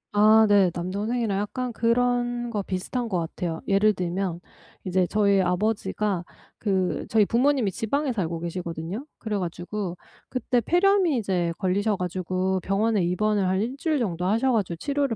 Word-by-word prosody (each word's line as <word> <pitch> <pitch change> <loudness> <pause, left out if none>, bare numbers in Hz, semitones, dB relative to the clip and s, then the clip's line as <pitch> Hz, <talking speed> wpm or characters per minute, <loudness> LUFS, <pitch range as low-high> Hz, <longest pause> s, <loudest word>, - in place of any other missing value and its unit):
아 215 +1 +6
네. 200 -3 +5
남동생이랑 200 +4 -1
약간 245 +4 -3
그런 240 +1 +1
거 210 - -1
비슷한 210 +6 -3
것 185 - 0
같아요. 165 0 -4
예를 205 +2 +4
들면 180 -1 -2 0.4
이제 185 -1 +1
저희 200 -1 +3
아버지가 200 0 0 0.4
그 190 -4 -1
저희 215 -2 +4
부모님이 245 -1 +2
지방에 265 - -1
살고 170 -6 -2
계시거든요. 170 - -5
그래 215 -3 -3
가지고 180 +1 -4 0.3
그때 250 -1 0
폐렴이 355 - +3
이제 180 -5 0
걸리셔 200 +2 +1
가지고 185 +1 -1
병원에 200 +1 +1
입원을 195 +3 +1
한 190 +1 +1
1 235 +5 -2
주일 310 +1 0
정도 180 -8 -2
하셔 230 +7 +2
가지고 200 -7 0
치료를 280 - -1
205 Hz, 335 characters per minute, -25 LUFS, 185-235 Hz, 0.4 s, 아